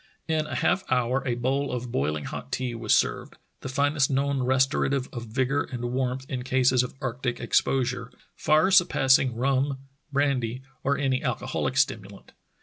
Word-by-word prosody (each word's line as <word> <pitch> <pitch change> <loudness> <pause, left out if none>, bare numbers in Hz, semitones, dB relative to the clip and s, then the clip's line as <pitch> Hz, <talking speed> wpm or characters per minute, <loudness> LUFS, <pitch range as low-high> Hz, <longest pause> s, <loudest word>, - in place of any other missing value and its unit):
In 155 -1 0
a - - -5
half 195 - +1
hour 125 +1 +1
a 120 - 0
bowl 135 +4 -1
of 125 -1 -4
boiling 75 -1 -1
hot - - -7
tea 125 -2 -2
was 115 -2 +2
served, - - -1 0.2
the - - -6
finest 140 +1 +1
known 140 0 0
restorative 130 +1 +1
of 120 -2 -6
vigor 130 +5 0
and 120 -1 -4
warmth 130 0 -2
in 130 -2 -4
cases 130 0 +3
of 125 - -5
arctic 125 -1 -3
ex - - +3
posure 125 -2 -2 0.2
— - - -43
far 155 +5 +4
surpassing 135 -9 +4
rum, 135 +2 0 0.3
brandy, 130 -3 0 0.2
or 140 +1 +1
any 135 -2 0
alcoholic - - -2
stimulant. - - -1
130 Hz, 165 wpm, -26 LUFS, 125-140 Hz, 0.3 s, far